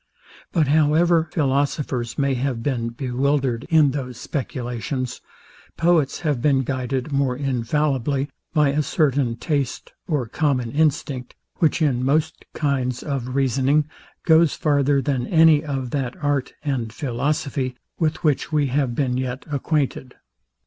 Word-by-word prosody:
But 160 -5 +2
however 160 +2 +3
philosophers 140 -4 -1
may 140 -1 +1
have 125 -2 -2
been 120 -5 -1
bewildered 130 0 -1
in 155 -4 +5
those 130 -3 -5
speculations, 130 -2 -4 0.6
poets 165 -5 +2
have 150 -7 0
been 135 -2 +3
guided 130 +1 -2
more 135 -3 +1
infallibly, 135 +1 0 0.2
by 150 -4 +3
a 145 +2 +1
certain 140 -5 +1
taste 140 -2 -2
or 145 -7 0
common 125 -1 0
instinct, 140 -4 0 0.2
which 160 0 +2
in 125 -4 +1
most 155 +4 0
kinds 130 -4 -1
of 130 -3 -3
reasoning 135 +2 +2 0.4
goes 160 -1 +5
farther 145 -3 +2
than 130 -4 -1
any 160 -2 +5
of 135 -4 -3
that 130 -4 -2
art 145 -3 -1
and 130 -7 -2
philosophy, 135 0 -2 0.2
with 160 -2 0
which 150 -1 +1
we 150 -2 +2
have 130 -2 0
been 125 -2 0
yet 130 0 -3
acquainted. 140 -2 -1
140 Hz, 130 wpm, -22 LUFS, 125-150 Hz, 0.6 s, in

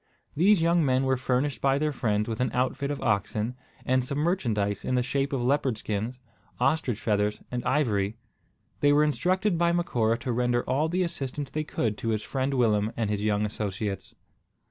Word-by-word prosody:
These 185 +2 +4
young 170 0 +3
men 130 -1 +2
were 130 0 +2
furnished 130 0 -1
by 135 0 +3
their 150 +1 0
friends 105 -5 0
with 110 -2 -3
an 125 - +1
outfit 130 +2 0
of 145 - -3
oxen, 105 +2 0 0.3
and 130 0 +2
some 140 +3 -4
merchandise 115 - 0
in 130 - 0
the 125 - +2
shape 135 +2 -1
of 135 -3 -1
leopard 130 -2 +1
skins, 110 +4 -3 0.4
ostrich 130 -8 +1
feathers, 105 -1 0
and 125 -1 -2
ivory. 110 -7 +1 0.6
They 145 0 +4
were 150 +1 +5
instructed 180 +4 +1
by 170 0 +3
Macora 115 -10 +1
to 125 - -2
render 120 0 +1
all 145 +5 0
the 180 +2 +1
assistance 145 -4 -4
they 155 - -2
could 110 -7 -2
to 115 - -2
his 110 -1 0
friend 135 +2 -1
Willem 110 -3 +2
and 110 -3 0
his 105 0 -1
young 105 0 +1
associates. 105 -1 -4
125 Hz, 190 wpm, -27 LUFS, 110-145 Hz, 0.6 s, were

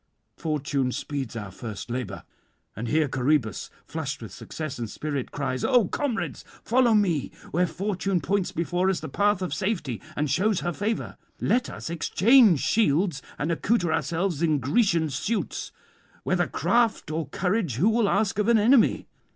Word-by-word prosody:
Fortune 140 -4 -1
speeds 135 -3 -4
our 105 -3 -5
first 110 +3 -7
labour. 125 -4 -4 0.5
And 115 +4 -4
here 155 +3 +2
Coroebus, 130 -4 0 0.2
flushed - - -4
with - - -9
success 155 -5 -6
and 115 -2 -3
spirit, 145 -1 -4
cries: 130 -3 -2
"O 245 -7 +4
comrades, 280 -6 -2 0.2
follow 245 -2 +3
me 175 -9 +1 0.2
where 180 +3 +2
fortune 195 0 -1
points 190 +4 0
before 175 +3 0
us 190 - 0
the - - -6
path 205 -2 +1
of 180 - -3
safety, 180 - -2
and 150 - 0
shews 185 - +1
her 175 - -2
favour. 215 +5 -3 0.2
Let 245 +1 +1
us - - -6
exchange 195 - +5
shields, 175 -7 +2 0.2
and 155 +3 -1
accoutre 175 -1 +1
ourselves 165 +1 -1
in 155 -3 +3
Grecian 160 - +2
suits; 205 - -2 0.5
whether - - +1
craft 230 -9 +1
or 155 -2 -2
courage, 180 - -1
who 165 - +2
will 225 -2 +2
ask 200 0 +1
of 210 - +1
an 235 -1 +5
enemy? 230 +3 +4
170 Hz, 160 wpm, -26 LUFS, 140-205 Hz, 0.5 s, exchange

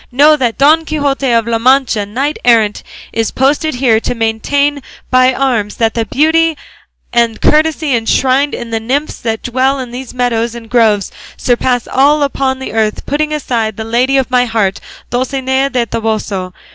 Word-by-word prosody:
Know 295 +5 +5
that 245 -6 -1
Don 310 +4 +4
Quixote 285 -3 -1
of 230 -1 +2
La 230 -1 0
Mancha, 250 -4 +2
knight 270 +8 -2
errant, 225 -4 +3 0.3
is 225 -1 0
posted 290 +3 0
here 245 -3 +2
to 245 - -3
maintain 280 +6 0 0.3
by 255 0 +4
arms 245 -6 -1
that 225 -1 0
the 230 -1 -1
beauty 320 +3 +2 0.6
and 235 -2 +1
courtesy 310 -1 +2
enshrined 260 +5 +1
in 235 -1 -7
the 225 - -1
nymphs 270 +7 -2
that 225 -1 -3
dwell 260 +3 0
in 250 -2 -6
these 250 0 -7
meadows 240 -2 -1
and 230 -1 -11
groves 220 -5 +2 0.3
surpass 245 0 0
all 290 +3 +3
upon 265 -1 -1
earth, 215 -1 -1
putting 300 +1 -1
aside 235 -8 -2
the 220 - -4
lady 245 +4 +1
of 265 -1 -1
my 250 0 +3
heart, 215 -4 -1 0.3
Dulcinea 265 +2 0
del 250 -3 0
Toboso. 215 -5 -3
250 Hz, 165 wpm, -13 LUFS, 225-275 Hz, 0.6 s, Know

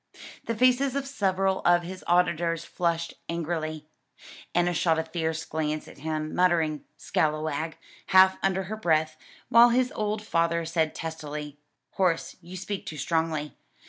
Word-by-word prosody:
The 230 - -1
faces 255 +3 +3
of 280 -1 -1
several 195 -6 0
of 175 0 +3
his 185 +2 -8
auditors 170 -1 +2
flushed 170 -1 -1 0.2
angrily. 155 -2 -3 0.7
Enna 175 0 +3
shot 165 -1 +2
a 160 - 0
fierce 160 -1 -3
glance 155 -1 -2
at - - -13
him, 155 +1 -3
muttering 165 -4 +2
"scalawag," 155 0 -1 0.3
half 190 0 +6
under 190 0 +1
her 215 +4 -5
breath, 160 -5 +1 0.3
while 235 +1 +8
his 250 +1 +2
old 210 0 -2
father 170 -4 +1
said 160 -1 0
testily, 150 -2 -6 0.3
"Horace, 180 -4 0
you 180 +2 -9
speak 195 +2 -5
too 155 - -6
strongly. 160 -1 -1
170 Hz, 145 wpm, -27 LUFS, 155-190 Hz, 0.7 s, while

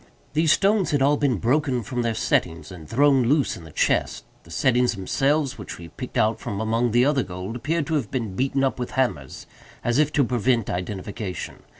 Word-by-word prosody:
These 155 0 +4
stones 200 -2 +2
had 145 -4 +2
all 145 +2 +4
been 140 -4 +1
broken 125 - +1
from 125 +3 -3
their 115 -1 -1
settings 80 -7 -1
and 85 -4 -11
thrown 135 0 +4
loose 140 +2 +2
in 85 - -11
the 80 - -12
chest. - - 0 0.2
The - - -17
settings 125 - +2
themselves, 135 +8 0
which 105 - -7
we 85 -1 -10
picked - - -7
out 110 +1 +2
from 100 -5 -4
among 115 +2 +1
the 120 +3 +3
other 140 -1 +2
gold, 95 +2 -6
appeared 155 +5 -1
to 160 - -3
have 140 -9 0
been 115 -8 -3
beaten 135 +3 0
up 135 -1 0
with 125 - -3
hammers, 75 - -1 0.4
as 120 +3 +1
if 150 0 +3
to 145 - +3
prevent 120 -2 +1
identification. 95 +2 -5
120 Hz, 205 wpm, -24 LUFS, 100-140 Hz, 0.4 s, These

